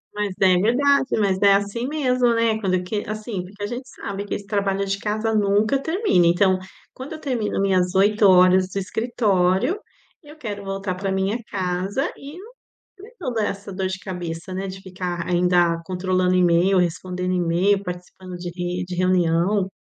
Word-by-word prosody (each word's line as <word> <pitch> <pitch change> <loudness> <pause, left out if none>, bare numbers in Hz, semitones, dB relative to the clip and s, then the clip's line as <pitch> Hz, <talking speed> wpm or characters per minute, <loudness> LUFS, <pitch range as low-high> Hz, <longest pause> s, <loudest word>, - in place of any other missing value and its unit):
Mas 210 -1 -1
é 185 -1 +6
verdade, 270 +7 +2
mas 195 -3 +1
é 200 -1 +6
assim 205 +5 -2
mesmo, 255 -5 +1
né, 230 -1 +1
quando 185 -3 0
que 205 +3 -3
assim, 215 -3 -4
porque 200 +3 -10
a - - 0
gente 250 +3 -6
sabe 200 -4 -6
que - - -3
esse 200 - -7
trabalho 200 -1 -1
de 195 0 -2
casa 215 +2 -1
nunca 210 +5 +2
termina, 325 - +2
então, 185 +2 +3 0.3
quando 260 +4 -8
eu 315 - -7
termino 245 -10 -2
minhas 185 -2 +1
8 205 +2 +4
horas 185 0 +5
do 195 - -6
escritório, 210 - +1 0.4
eu 300 -2 -14
quero 210 -8 -6
voltar 195 -1 -3
pra 195 +1 -3
minha 190 +3 0
casa 190 +7 -2
e 285 +4 -10
não 420 +6 -12 0.5
ter 465 +4 -13
toda 240 - -2
essa 200 -1 -4
dor 190 0 -2
de 190 +1 -4
cabeça, 175 -2 -6
né, 190 +1 -3
de 190 0 -7
ficar 180 -2 -5
ainda, 175 -1 +2
controlando 185 0 0
e-mail, 180 +2 +3
respondendo 180 +1 -1
e-mail, 180 +3 +2
participando 180 0 -8
de 175 0 -6
re 180 0 -3
de 180 0 -6
reunião. 185 +2 +2
195 Hz, 175 wpm, -22 LUFS, 180-215 Hz, 0.5 s, é